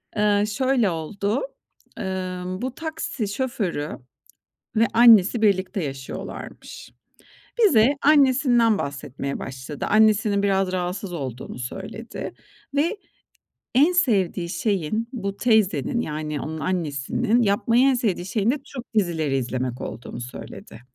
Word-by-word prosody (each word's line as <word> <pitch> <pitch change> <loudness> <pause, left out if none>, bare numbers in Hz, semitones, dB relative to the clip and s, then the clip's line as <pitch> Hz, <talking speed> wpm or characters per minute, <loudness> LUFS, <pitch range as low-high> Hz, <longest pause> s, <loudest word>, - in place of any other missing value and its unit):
Eee, 205 -1 +3
şöyle 255 -1 +1
oldu: 200 +7 -2 0.6
Imm, 185 -1 -4
bu 255 0 -3
taksi 315 -8 -4
şoförü 205 - -2 0.9
ve 230 - +5
annesi 225 -2 +6
birlikte 190 -3 +1
yaşıyorlarmış. 135 -1 -7 0.7
Bize, 275 - +5
annesinden 260 -6 +4
bahsetmeye 140 -3 -4
başladı. 130 +2 -6
Annesinin 215 -1 +3
biraz 195 -2 +2
rahatsız 180 +1 -3
olduğunu 130 -5 -6
söyledi 195 - -6 0.4
ve 335 +9 +1 0.8
en 290 +7 +6
sevdiği 195 - +1
şeyin, 200 +3 -1
bu 200 -5 -4
teyzenin 220 - +2
-yani 150 -1 -4
onun 160 +1 -5
annesinin 180 - 0
yapmayı 230 +3 +3
en 270 0 +5
sevdiği 215 -8 -1
şeyin 210 +4 +1
de - - 0
Türk 250 -3 -10
dizileri 160 -9 +1
izlemek 125 0 -3
olduğunu 120 +1 -7
söyledi. 120 -1 -9
200 Hz, 110 wpm, -23 LUFS, 160-235 Hz, 0.9 s, annesi